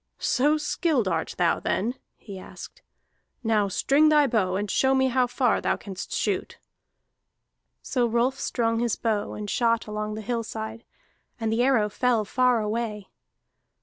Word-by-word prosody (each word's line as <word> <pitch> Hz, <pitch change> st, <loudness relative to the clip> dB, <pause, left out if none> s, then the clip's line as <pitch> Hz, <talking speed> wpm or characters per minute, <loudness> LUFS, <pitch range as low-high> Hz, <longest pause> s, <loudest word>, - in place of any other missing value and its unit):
"So 295 Hz, +4 st, +2 dB
skilled 300 Hz, -, 0 dB
art 165 Hz, -3 st, -2 dB
thou 175 Hz, -2 st, +2 dB
then?" 230 Hz, +5 st, -1 dB, 0.2 s
he 195 Hz, -3 st, -10 dB
asked. -, -, -11 dB, 0.6 s
"Now 215 Hz, -3 st, +2 dB
string 285 Hz, +10 st, +3 dB
thy 300 Hz, -1 st, +5 dB
bow, 210 Hz, -8 st, +1 dB
and 205 Hz, +2 st, -1 dB
show 265 Hz, 0 st, +3 dB
me 265 Hz, 0 st, +3 dB
how 250 Hz, 0 st, +2 dB
far 245 Hz, -1 st, +1 dB
thou -, -, 0 dB
canst 190 Hz, -2 st, -8 dB
shoot." -, -, -2 dB, 1.3 s
So 245 Hz, -2 st, 0 dB
Rolf 240 Hz, +4 st, 0 dB
strung 230 Hz, -2 st, 0 dB
his 235 Hz, -2 st, 0 dB
bow, 215 Hz, -3 st, -1 dB
and 210 Hz, -1 st, -6 dB
shot 230 Hz, +1 st, +1 dB
along 210 Hz, 0 st, -4 dB
the 215 Hz, -, -5 dB
hillside, 220 Hz, 0 st, -4 dB, 0.5 s
and 225 Hz, -1 st, -1 dB
the 230 Hz, -, +1 dB
arrow 245 Hz, -5 st, +3 dB
fell 230 Hz, +1 st, +1 dB
far 250 Hz, +1 st, +2 dB
away. 210 Hz, -1 st, -3 dB
230 Hz, 150 wpm, -25 LUFS, 210-250 Hz, 1.3 s, thy